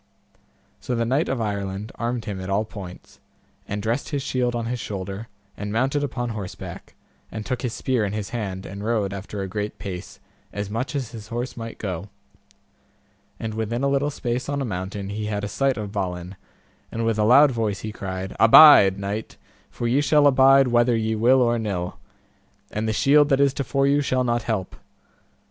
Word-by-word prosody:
So 125 - -3
the 115 0 0
knight 135 +7 +1
of 135 - -1
Ireland 100 -1 -3
armed 120 0 -3
him 100 -3 -4
at 95 - -6
all 100 +3 +1
points, 95 -4 -10 0.5
and 105 0 -4
dressed 115 +5 -1
his 140 -2 -2
shield 125 -3 0
on 115 -1 -2
his 120 +1 -3
shoulder, 100 0 -5 0.3
and 105 0 -5
mounted 135 +6 +1
upon 120 -3 -3
horseback, 105 -5 -7 0.4
and 110 -1 -6
took 125 -2 -2
his 125 -4 -3
spear 130 -4 0
in 100 - -1
his 105 -1 -4
hand, 100 -6 -4
and 100 +1 -7
rode 105 -3 0
after 100 +1 -6
a - - -4
great 105 +2 -4
pace, 90 -3 -7 0.3
as 100 0 -5
much 125 +7 -3
as 130 -5 -3
his 110 -3 -9
horse 120 +3 -4
might 115 -1 -7
go; 95 -1 -5 1.3
and 110 -1 -4
within 110 +3 -2
a - - +3
little 140 +1 +1
space 125 -3 -3
on 145 0 -1
a 135 - -1
mountain 95 -1 -4
he 105 +1 -4
had 105 -1 -2
a - - -1
sight 135 +4 0
of 105 -2 -5
Balin, 90 -2 -4 0.6
and 115 0 -2
with 115 -1 0
a - - +3
loud 135 +6 +7
voice 110 -5 -2
he 110 - -5
cried, 95 -2 -5
Abide, 115 -5 +9
knight, 100 +2 -5 0.3
for 120 - -3
ye 130 +5 +3
shall 145 +1 +4
abide 135 -1 +6
whether 120 0 +3
ye 110 0 0
will 125 +4 +4
or 120 -1 +1
nill, 95 -5 -3 0.7
and 110 +1 -2
the - - +1
shield 145 +6 +4
that 135 -2 +3
is 140 -1 +4
to 140 - -2
fore 135 +2 +1
you 140 +1 +3
shall 130 -2 +1
not 120 -1 0
help. 105 -5 -3
115 Hz, 200 wpm, -23 LUFS, 100-130 Hz, 1.3 s, Abide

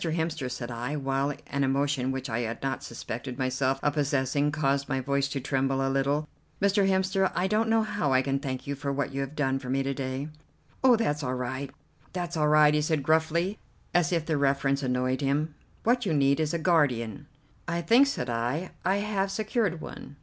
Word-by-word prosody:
Hemster," 160 -4 -1
said 125 -1 -5
I, 120 +5 -3
while 135 0 0
an 140 -1 -1
emotion 135 -1 +1
which 135 0 -4
I 115 -2 -2
had 115 0 -4
not 135 -2 -1
suspected 120 +2 -6
myself 130 +1 0
of 145 - +2
possessing 145 0 +1
caused 140 -2 0
my 135 -2 0
voice 140 +1 0
to 140 0 -3
tremble 135 0 0
a 135 - 0
little; 140 +3 +1 0.3
"Mr. 200 0 +3
Hemster, 190 0 +2
I 180 - +1
don't 215 +3 +1
know 225 0 +4
how 205 -9 -1
I 130 0 +4
can 135 0 0
thank 130 -3 -4
you 140 - -2
for 140 0 -3
what 140 0 -2
you 140 - -1
have 135 +2 -5
done 135 -3 +1
for 130 -2 -8
me 135 +1 +1
to 135 0 -1
day." 135 +2 -4 0.5
"Oh, 255 -2 +7
that's 150 -10 0
all 130 -2 -2
right, 130 +2 -3 0.4
that's 175 -1 -3
all 155 -1 +2
right!" 150 0 +6
he 150 - +2
said 155 -1 0
gruffly, 160 +6 +1 0.3
as 175 -2 +3
if 165 -3 0
the 160 -2 0
reference 140 0 +1
annoyed 130 +1 0
him. 145 +3 0 0.3
"What 245 +2 +3
you 160 - +1
need 140 0 +3
is 155 -1 +1
a 170 - 0
guardian." 145 - +1 0.4
"I 170 0 -1
think," 245 +9 +5
said 130 - -2
I, 120 +9 -2
"I 190 - +2
have 200 -1 0
secured 205 -3 -1
one." 140 - -9
140 Hz, 210 wpm, -28 LUFS, 135-165 Hz, 0.5 s, Oh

